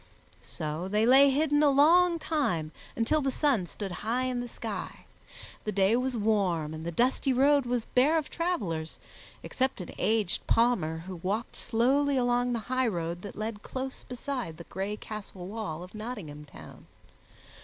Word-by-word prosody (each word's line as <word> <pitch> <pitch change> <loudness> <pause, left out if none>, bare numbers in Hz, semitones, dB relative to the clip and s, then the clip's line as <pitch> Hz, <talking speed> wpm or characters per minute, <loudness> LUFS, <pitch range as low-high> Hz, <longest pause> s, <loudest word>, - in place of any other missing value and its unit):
So 155 +4 -4
they 210 +3 +2
lay 270 +3 +7
hidden 295 +1 +2
a 295 - +6
long 335 +5 +5
time, 225 - -1 0.2
until 235 +7 +1
the 275 - 0
sun 260 - +1
stood 195 +2 -6
high 235 +4 0
in 255 -1 -1
the 245 - -4
sky. - - -6 0.6
The 215 - -2
day 195 +2 +3
was 250 0 0
warm 190 -8 +1
and 160 0 -6
the 170 - -3
dusty 255 +7 +1
road 275 +1 +4
was 245 -2 -1
bare 285 +6 +3
of 310 - -1
travelers, 200 - -2 0.5
except 260 -2 -1
an 180 - -6
aged 215 -3 0
palmer 175 -9 +2
who 185 -1 -6
walked 200 +7 -3
slowly 265 +4 +2
along 245 0 +2
the 240 - 0
highroad 180 -10 -1
that 200 - -8
led 215 -1 -4
close 260 +2 -5
beside 250 - -5
the 170 - -9
gray 195 +4 -4
castle 205 -5 -8
wall 195 -5 -5
of 180 - -12
Nottingham 205 -10 -7
Town. 85 - -13
230 Hz, 165 wpm, -29 LUFS, 185-265 Hz, 0.6 s, lay